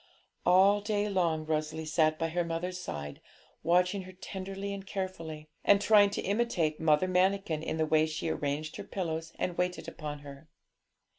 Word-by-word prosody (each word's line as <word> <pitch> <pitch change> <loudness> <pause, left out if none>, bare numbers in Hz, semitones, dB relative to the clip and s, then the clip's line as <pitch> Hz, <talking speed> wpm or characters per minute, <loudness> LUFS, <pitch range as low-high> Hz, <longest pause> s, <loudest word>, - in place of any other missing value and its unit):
All 195 +3 +6
day 210 0 0
long 170 -6 0
Rosalie 155 0 -2
sat 155 0 +2
by 165 0 -1
her 175 +2 0
mother's 175 +2 -3
side, 75 - -6 0.4
watching 180 +4 +2
her 185 0 -10
tenderly 195 +1 -5
and 195 -1 -6
carefully, 165 -6 -5 0.2
and 200 - +6
trying 205 -1 +6
to 200 - -3
imitate 195 -7 0
Mother 160 +2 +3
Manikin 185 -3 +1
in 160 - -3
the 160 - +2
way 155 0 +3
she 155 +1 -3
arranged 150 0 -2
her - - -5
pillows 165 -3 -4
and 175 - -2
waited 180 -2 -1
upon 150 -3 -6
her. 140 +2 -12
170 Hz, 165 wpm, -30 LUFS, 155-190 Hz, 0.4 s, All